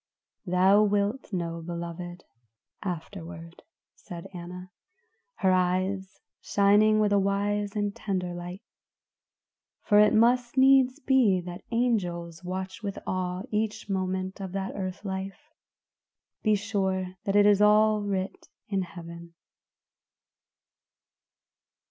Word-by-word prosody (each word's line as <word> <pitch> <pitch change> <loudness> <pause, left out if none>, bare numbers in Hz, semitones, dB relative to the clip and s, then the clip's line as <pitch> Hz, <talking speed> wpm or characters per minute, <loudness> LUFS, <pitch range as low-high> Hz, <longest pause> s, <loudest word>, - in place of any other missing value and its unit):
"Thou 190 +3 +5
wilt 205 +4 0
know, 170 -3 -3
beloved, 170 +1 -6 0.6
afterward," 170 -2 -7 0.3
said 175 - -9
Anna, 180 +1 -8 0.6
her 190 -2 +2
eyes 185 +1 0 0.2
shining 210 +2 +4
with 210 -1 +2
a 200 - +4
wise 200 +1 0
and 205 -1 -1
tender 185 -4 -3
light. 175 +2 -7 1.2
"For 205 -1 +4
it 210 +1 +5
must 240 +3 +3
needs 265 0 +5
be 255 -10 +3
that 175 +1 -8
angels 180 -8 -1
watched 185 +3 -5
with 200 -2 -4
awe 185 0 -2
each 215 -1 -2
moment 190 0 -2
of 190 -1 -6
that 195 0 -3
earth 190 +1 -5
life; 195 +10 -6 0.9
be 215 -1 +3
sure 190 -3 -1
that 195 - 0
it 205 0 +6
is 205 -1 +5
all 215 0 +5
writ 195 -1 -3 0.2
in 195 -2 0
heaven." 170 -1 -9
195 Hz, 110 wpm, -27 LUFS, 180-210 Hz, 1.2 s, it